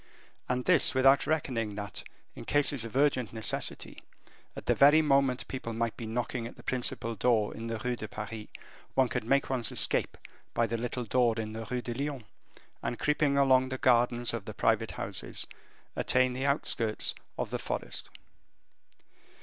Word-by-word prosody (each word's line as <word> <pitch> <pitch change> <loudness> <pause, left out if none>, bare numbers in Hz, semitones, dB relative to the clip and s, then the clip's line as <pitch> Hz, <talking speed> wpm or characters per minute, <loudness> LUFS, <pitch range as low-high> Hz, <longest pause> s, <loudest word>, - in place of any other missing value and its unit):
And 125 0 -1
this 180 -8 +4
without 135 +1 +5
reckoning 120 -9 -1
that, 100 0 -5 0.3
in - - -9
cases 145 -4 +2
of 115 +1 -8
urgent 135 -5 +2
necessity, 110 -1 -2 0.5
at - - -8
the - - +3
very 145 +3 +6
moment 135 -3 +2
people 130 -3 -5
might 115 0 -1
be 115 - -7
knocking 120 +1 -3
at - - -11
the - - -15
principal 120 -2 -2
door 110 -1 +1
in 115 +1 -6
the 115 0 -3
Rue 125 +3 -2
de 110 - -6
Paris, 105 +1 -7 0.5
one 130 -2 +3
could 115 - -2
make 135 +5 +2
one's 125 -5 -1
escape - - +3 0.4
by 115 - +3
the 115 +1 -2
little 125 +2 -3
door 120 0 +2
in 110 -1 -4
the 110 0 -6
Rue 125 -1 -2
de 120 - -4
Lyon, 140 0 -4 0.6
and, 120 0 -3
creeping 150 -1 +1
along 130 -2 +4
the 130 - -3
gardens 120 -2 +2
of 115 -4 -4
the - - -7
private - - +1
houses, - - -3 0.5
attain 130 0 +2
the 130 +2 -2
outskirts 115 -6 +2 0.2
of - - -3
the - - -2
forest. - - -4
125 Hz, 175 wpm, -30 LUFS, 115-135 Hz, 0.6 s, very